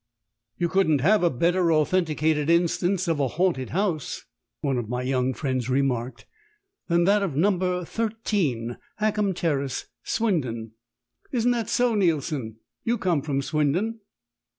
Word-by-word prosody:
"You 175 - +1
couldn't 160 -6 +2
have 205 +9 +4
a 175 - +4
better 170 +5 +2
authenticated 155 -2 +1
instance 175 +2 +2
of 165 -3 0
a 140 - +2
haunted 155 -2 0
house," 180 -6 -2 0.4
one 135 -4 0
of 110 -3 -5
my 125 +1 -2
young 130 0 +1
friends 130 -4 -2
remarked, 130 -2 -1 0.6
"than 170 0 +3
that 200 +3 +4
of 185 -8 -2
No., 190 +8 +4 1.4
Hackham 210 -2 0
Terrace, 140 -6 -1 0.2
Swindon. 130 - -1 0.6
Isn't 245 -1 +2
that 235 -3 -1
so, 245 -1 +2
Neilson? 150 - 0 0.3
You 235 +1 +1
come 175 -8 +1
from 140 -1 -1
Swindon." 165 +11 0
160 Hz, 130 wpm, -25 LUFS, 135-190 Hz, 1.4 s, have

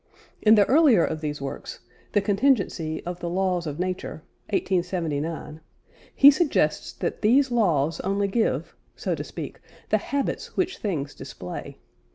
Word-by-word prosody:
In 215 0 +7
the 205 -2 +5
earlier 270 - +5
of 155 -1 -4
these 150 -1 -3
works, 135 - -6 0.3
The 205 - +4
Contingency 195 - +1
of 175 0 -5
the 175 - -3
Laws 180 -1 0
of 145 -1 -4
Nature 180 -4 -3 0.3
(1879) 165 -5 -2 0.5
he 280 +1 +9
suggests 305 +1 +1
that - - -4
these 260 +5 +4
laws 165 -10 +2
only 200 +1 0
give, 220 +3 -1 0.2
so - - -2
to - - -3
speak, - - -8 0.3
the - - +3
habits 280 -1 -3
which 375 0 0
things 150 -9 -3
display. 90 -9 -8
185 Hz, 145 wpm, -25 LUFS, 160-225 Hz, 0.5 s, he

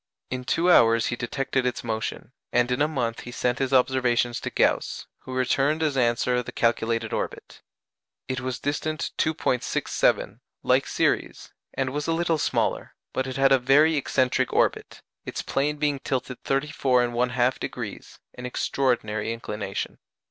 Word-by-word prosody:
In 125 0 -3
two 170 +7 +2
hours 115 -6 +5
he - - -1
detected 135 +2 -1
its 125 -1 -2
motion, 110 +1 -4 0.2
and 120 +1 +2
in 125 +3 0
a 150 - +4
month 120 -7 -2
he 120 - -8
sent 125 +1 -1
his 135 -1 0
observations 125 -2 +2
to - - -4
Gauss, - - 0
who 130 - -9
returned 135 +5 +1
as 150 -3 +1
answer 125 0 +2
the 120 - -8
calculated 115 -1 0
orbit. - - -5 0.7
It 130 -1 -2
was 130 -1 -3
distant 155 +2 -2
2·67, 155 -5 0 0.2
like - - +3
Ceres, - - -1 0.2
and 130 -1 -1
was 145 +1 -3
a 165 - +2
little 165 -1 +1
smaller, - - -1 0.2
but 130 0 -1
it 130 - -4
had 135 0 +4
a 135 - +6
very 145 +6 +5
excentric 130 -3 +1
orbit: - - 0 0.2
its - - -4
plane 150 +2 0
being 145 -2 0
tilted 130 -1 -3
34 135 -2 +1
1/2°, 120 +1 -1 0.2
an 125 - -6
extraordinary 120 -5 0
inclination. 105 -4 -5
130 Hz, 150 wpm, -25 LUFS, 120-140 Hz, 0.7 s, a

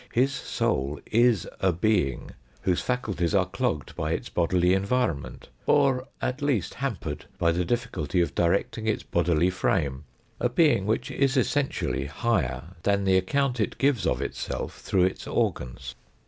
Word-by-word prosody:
His 130 +4 +3
soul 70 - -1
is 115 -4 +3
a 95 - +3
being 90 - 0 0.3
whose 90 -2 +1
faculties 105 -9 -1
are - - +4
plogged 75 -3 -2
by - - -1
its - - -4
bodily 90 +1 +2
environment, 95 - -1 0.2
or 135 -3 +3
at 130 +3 -2
least 135 - 0
hampered 110 - -4
by 85 - +3
the 90 +2 0
difficulty 95 - -1
of 85 - +1
directing 100 +5 0
its 110 - 0
bodily 85 +1 +2
frame 70 -5 0 0.3
a 120 - +1
being 120 - +3
which 115 +3 0
is 135 0 +1
essentially 130 - 0
higher 85 - -1
than 100 +1 +1
the 95 -1 +3
account 125 +6 0
it 105 - -1
gives 135 -6 +2
of 65 +2 0
itself - - -4
through 90 -2 +2
its 95 - -3
organs. - - -2
95 Hz, 150 wpm, -26 LUFS, 85-125 Hz, 0.3 s, are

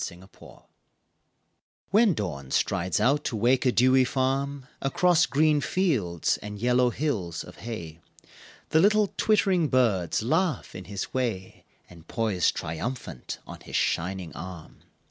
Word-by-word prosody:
Alarm 90 +1 -14
Clocks - - -16 1.2
When 210 -3 +4
Dawn 70 -10 -4
strides 85 +4 0
out 145 +3 +2
to - - -2
wake 120 +4 +2
a - - +4
dewy 130 +2 +4
farm 135 +1 -1 0.2
Across 175 +5 +3
green 150 +3 +3
fields 115 - 0
and 105 0 -8
yellow 125 +3 +3
hills 105 - -2
of 90 - -13
hay 85 -9 -7 0.7
The 160 - +4
little 210 +2 +3
twittering 190 -6 +2
birds 110 - +1
laugh 160 +7 0
in 95 - -8
his 100 -1 -5
way 115 -8 -3 0.2
And 85 -2 -16
poise 105 -7 +1
triumphant 80 - -5
on - - -10
his - - -9
shining 90 0 -1
arm. 85 0 -9
120 Hz, 135 wpm, -26 LUFS, 90-145 Hz, 1.2 s, When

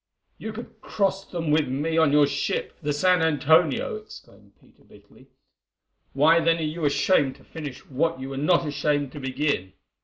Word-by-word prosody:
"You 220 - -6
could 230 +2 -11
cross 195 -1 -1
them 165 -4 -3
with 155 0 +2
me 145 +5 -2
on 160 -3 +4
your 145 0 +5
ship, 140 0 -3
the 145 - -2
San 180 +4 +2
Antonio," 160 +2 +2
exclaimed 105 - -15
Peter - - -25
bitterly, - - -20 0.9
"why 155 +5 +4
then 165 0 +2
are 165 - -3
you 155 +1 -3
ashamed 145 -1 +2
to - - -20
finish 145 -4 -9
what 155 +3 -1
you 135 +1 -6
were 135 - -6
not 170 +4 +2
ashamed 145 -2 -1
to 145 - -9
begin? 130 -8 -2
150 Hz, 175 wpm, -24 LUFS, 140-165 Hz, 0.9 s, your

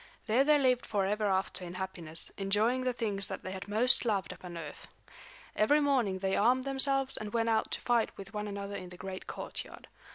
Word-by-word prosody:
There 235 +4 +3
they 300 +1 +4
lived 255 -3 +1
forever 210 +1 0
after 190 -1 -1
in 175 0 -8
happiness, 175 -4 +1
enjoying 210 +6 0
the 255 0 0
things 210 -5 -2
that - - -7
they 185 - -6
had 190 +1 -7
most 225 +5 +5
loved 200 -7 -1
upon 175 -1 -10
earth. 155 -3 -9 0.7
Every 290 +8 +3
morning 260 -10 +1
they 190 0 -1
armed 250 +4 +3
themselves 270 0 +3
and 210 -1 -6
went 230 -1 +1
out 220 -1 +1
to - - -3
fight 240 -2 +1
with 195 0 -10
one 210 0 -4
another 200 0 -6
in 185 -2 -7
the 180 - -12
great 190 0 -7
courtyard. - - -6
210 Hz, 200 wpm, -31 LUFS, 190-250 Hz, 0.7 s, most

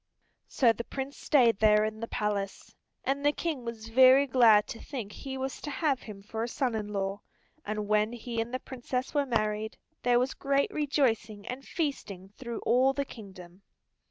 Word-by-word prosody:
So 235 -4 +3
the 235 - -5
Prince 270 +3 -5
stayed 240 -8 +3
there 215 0 +5
in 215 0 -4
the 230 - -4
palace, 205 -3 -3 0.3
and 275 +1 -1
the 290 - +5
King 300 -4 -3
was 225 -1 -7
very 260 +3 +7
glad 230 -6 +5
to 230 - -6
think 235 -8 -6
he 265 +4 -6
was 265 0 -4
to - - -5
have 285 -2 0
him 200 -3 -10
for 220 +2 -5
a 230 - -1
son 245 0 -1
in 215 -2 -3
law, 200 -1 -3 0.5
and 210 0 -2
when 215 +1 +2
he 235 -1 -3
and 230 +1 -5
the 255 - -1
Princess 255 0 -4
were 285 -2 +1
married, 215 -2 -1 0.2
there 245 0 +3
was 255 +2 +1
great 275 0 0
rejoicing 230 -8 0
and 255 +2 -6
feasting 205 - -3
through 235 +2 -7
all 255 +3 +3
the 280 0 -2
kingdom. 190 -6 -12
235 Hz, 185 wpm, -29 LUFS, 210-265 Hz, 0.5 s, very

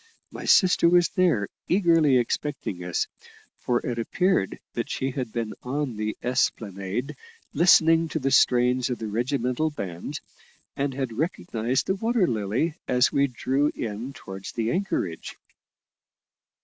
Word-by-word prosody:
My - - -8
sister 180 -3 +5
was 175 -2 +4
there, 165 - +2 0.2
eagerly 165 -7 +4
expecting 120 -6 -2
us; 90 -2 -1 0.5
for 120 -1 -1
it 120 -2 -2
appeared 180 - 0
that - - -3
she 135 +1 -2
had 125 -3 -4
been 115 -2 -3
on 135 -1 -3
the 105 0 -3
Esplanade 110 -3 -1 0.4
listening 165 -1 +5
to - - -2
the 135 -2 -1
strains 125 0 +3
of 125 - -2
the 110 - -6
regimental 125 +6 -1
band, 90 - -6 0.6
and 140 0 -1
had 130 -4 -3
recognised 120 - -1
the - - +1
Water 225 +1 +1
Lily 115 - -1
as 125 0 +3
we 140 0 +2
drew 135 +3 0
in 115 +4 -4
towards 95 -5 -9
the 115 0 -1
anchorage. 175 - -3
125 Hz, 135 wpm, -25 LUFS, 110-155 Hz, 0.6 s, sister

